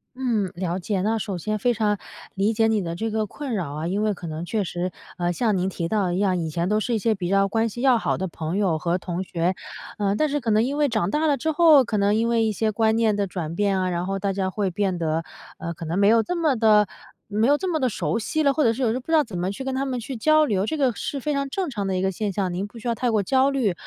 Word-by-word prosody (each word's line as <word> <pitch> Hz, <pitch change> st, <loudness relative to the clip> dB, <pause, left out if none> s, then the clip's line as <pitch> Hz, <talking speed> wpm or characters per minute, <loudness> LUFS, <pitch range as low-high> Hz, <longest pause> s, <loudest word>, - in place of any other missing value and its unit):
嗯， 230 Hz, -8 st, -1 dB
了 175 Hz, 0 st, -2 dB
解， 190 Hz, +1 st, -2 dB
那 220 Hz, +3 st, +1 dB
首 195 Hz, -4 st, -4 dB
先 215 Hz, +4 st, -2 dB
非 240 Hz, +4 st, +1 dB
常 210 Hz, -2 st, +1 dB, 0.4 s
理 200 Hz, +3 st, +1 dB
解 225 Hz, +1 st, +3 dB
你 220 Hz, -2 st, +1 dB
的 170 Hz, 0 st, -4 dB
这 225 Hz, +5 st, -2 dB
个 215 Hz, 0 st, -1 dB
困 255 Hz, +3 st, -5 dB
扰 170 Hz, -7 st, -3 dB
啊， 155 Hz, +3 st, -3 dB
因 200 Hz, +4 st, -1 dB
为 215 Hz, -, +1 dB
可 175 Hz, -3 st, -8 dB
能 160 Hz, +2 st, -5 dB
确 215 Hz, +2 st, -1 dB
实， 180 Hz, 0 st, -3 dB, 0.3 s
呃， 175 Hz, 0 st, 0 dB
像 215 Hz, 0 st, +1 dB
您 185 Hz, +1 st, 0 dB
提 170 Hz, -3 st, -3 dB
到 210 Hz, 0 st, +1 dB
的 175 Hz, -, -1 dB
一 180 Hz, -, -1 dB
样， 190 Hz, -3 st, +2 dB
以 165 Hz, -2 st, -2 dB
前 170 Hz, +3 st, -1 dB
都 210 Hz, +1 st, +2 dB
是 235 Hz, +2 st, -1 dB
一 220 Hz, -, +1 dB
些 220 Hz, +1 st, +1 dB
比 180 Hz, -2 st, -3 dB
较 195 Hz, 0 st, +3 dB
关 225 Hz, +3 st, +1 dB
系 240 Hz, +3 st, -6 dB
要 260 Hz, -3 st, +5 dB
好 -, -, 0 dB
的 190 Hz, +1 st, -3 dB
朋 165 Hz, +2 st, -4 dB
友 185 Hz, -6 st, +1 dB
和 175 Hz, +3 st, -1 dB
同 180 Hz, +1 st, -4 dB
学， 180 Hz, +1 st, -1 dB, 0.4 s
呃， 200 Hz, -1 st, +1 dB
但 305 Hz, +4 st, +1 dB
是 290 Hz, +1 st, 0 dB
可 230 Hz, -3 st, -1 dB
能 215 Hz, +1 st, +4 dB
因 275 Hz, +4 st, -2 dB
为 295 Hz, -1 st, +3 dB
长 190 Hz, -6 st, 0 dB
大 300 Hz, +7 st, 0 dB
了 295 Hz, -2 st, +3 dB
之 315 Hz, +5 st, -1 dB
后， 310 Hz, -3 st, +6 dB
可 225 Hz, -3 st, -2 dB
能 200 Hz, 0 st, +3 dB
因 225 Hz, +2 st, +2 dB
为 230 Hz, -1 st, +2 dB
一 220 Hz, -, +1 dB
些 215 Hz, +1 st, 0 dB
观 220 Hz, +1 st, +2 dB
念 225 Hz, -2 st, +2 dB
的 205 Hz, -, 0 dB
转 170 Hz, -4 st, -5 dB
变 200 Hz, -1 st, +1 dB
啊， 185 Hz, -, 0 dB
然 175 Hz, 0 st, -2 dB
后 195 Hz, 0 st, -2 dB
大 195 Hz, 0 st, -1 dB
家 190 Hz, -1 st, -1 dB
会 200 Hz, -1 st, -1 dB
变 185 Hz, -1 st, -1 dB
得， 160 Hz, 0 st, 0 dB, 0.3 s
呃， 170 Hz, 0 st, -5 dB
可 165 Hz, -, -9 dB
能 165 Hz, +3 st, -2 dB
没 200 Hz, 0 st, +4 dB
有 225 Hz, +1 st, +5 dB
这 360 Hz, -, -3 dB
么 315 Hz, -6 st, +2 dB
地 215 Hz, -2 st, +5 dB, 0.4 s
没 215 Hz, +3 st, +1 dB
有 290 Hz, +2 st, +4 dB
这 370 Hz, +2 st, -2 dB
么 315 Hz, -, 0 dB
地 255 Hz, -3 st, +1 dB
熟 170 Hz, -2 st, -1 dB
悉 310 Hz, +8 st, -1 dB
了， 280 Hz, -, +4 dB
或 305 Hz, -, +1 dB
者 230 Hz, -3 st, +4 dB
是 260 Hz, +3 st, -3 dB
有 230 Hz, -, +3 dB
时 -, -, +1 dB
候 255 Hz, -, -2 dB
不 255 Hz, -, -17 dB
知 325 Hz, -, -1 dB
道 310 Hz, -2 st, +5 dB
怎 185 Hz, -7 st, -6 dB
么 180 Hz, +2 st, -1 dB
去 205 Hz, -, -6 dB
跟 265 Hz, 0 st, -3 dB
他 270 Hz, +1 st, -1 dB
们 255 Hz, -2 st, -2 dB
去 255 Hz, +3 st, -6 dB
交 310 Hz, +6 st, +4 dB
流。 205 Hz, -3 st, 0 dB
这 315 Hz, -, -2 dB
个 260 Hz, -5 st, +2 dB
是 280 Hz, -, -4 dB
非 295 Hz, +3 st, -2 dB
常 275 Hz, -1 st, -1 dB
正 375 Hz, +3 st, -2 dB
常 205 Hz, -7 st, -3 dB
的 190 Hz, -, -1 dB
一 -, -, 0 dB
个 190 Hz, 0 st, +1 dB
现 205 Hz, +2 st, -2 dB
象， 185 Hz, -2 st, -2 dB
您 190 Hz, +3 st, -3 dB
不 230 Hz, -, -14 dB
需 230 Hz, -, -7 dB
要 235 Hz, -, +2 dB
太 245 Hz, +2 st, -1 dB
过 215 Hz, -3 st, +1 dB
焦 265 Hz, +5 st, +3 dB
虑。 250 Hz, -9 st, +1 dB
210 Hz, 335 characters per minute, -24 LUFS, 185-245 Hz, 0.4 s, 后